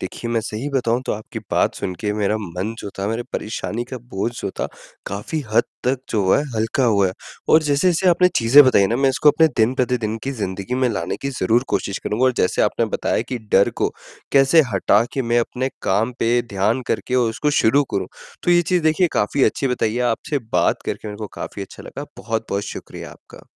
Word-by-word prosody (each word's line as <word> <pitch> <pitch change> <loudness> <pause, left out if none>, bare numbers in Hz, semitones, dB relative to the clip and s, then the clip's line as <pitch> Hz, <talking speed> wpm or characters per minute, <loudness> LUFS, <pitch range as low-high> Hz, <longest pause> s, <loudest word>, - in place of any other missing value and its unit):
देखिए 115 +5 -5
मैं 115 -1 +1
सही 110 +6 -4
बताऊँ 125 -3 +1
तो - - 0
आपकी 105 +1 -6
बात - - +2
सुन 90 - -4
के 105 -1 -1
मेरा 105 0 0
मन 95 +3 -4
जो 100 - -6
था, 100 - -1
मेरे 115 +2 -2
परेशानी 115 +2 -3
का 130 +1 -7
बोझ 100 +5 -1
जो - - -3
था, - - 0 0.4
काफ़ी 105 +11 -4
हद 115 - +5 0.2
तक 130 +1 +1
जो 105 -3 +1
है - - +4
हल्का 115 +4 0
हुआ 100 -4 +3
है 90 - -2 0.4
और 155 0 +7
जैसे-जैसे 160 +5 +2
आपने 180 +1 +4
चीज़ें 130 +5 +7
बताई 115 -6 +4
ना 115 +4 0
मैं 135 0 +3
इसको 150 +3 +3
अपने 160 +2 +4
दिन-प्रतिदिन 120 -1 +1
की 135 - -2
ज़िंदगी 95 +5 -3
में 130 -1 +2
लाने - - -3
की 140 - -2
ज़रूर 115 +7 +3
कोशिश 100 - -1
करूँगा 115 +5 0
और 130 - +4
जैसे 90 - +1
आपने - - +1
बताया - - 0
कि 125 - -3
डर 100 - +5
को - - 0 0.4
कैसे 135 +4 +6
हटा 100 +3 +3
के 135 - -1
मैं 120 0 +1
अपने 130 +3 -2
काम 110 +6 +1
पे 120 +1 +2
ध्यान 110 +3 0
करके 125 - -2
और 125 -2 +3
उसको 150 +6 -1
शुरू 140 +6 +4
करूँ, - - -1 0.4
तो 175 - +1
ये 175 0 +5
चीज़ 175 0 +1
देखिए 160 +3 +3
काफ़ी 130 +7 +1
अच्छी 135 - 0
बताई 115 -3 0
है। 125 - 0
आपसे 145 +5 -3
बात - - +2
करके 110 - -4
मेरे 105 - -7
को 105 - -4
काफ़ी 100 - -5
अच्छा 95 - -11
लगा, - - -7
बहुत-बहुत 110 -3 -2
शुक्रिया - - -8
आपका। - - -16
120 Hz, 215 wpm, -21 LUFS, 105-135 Hz, 0.4 s, और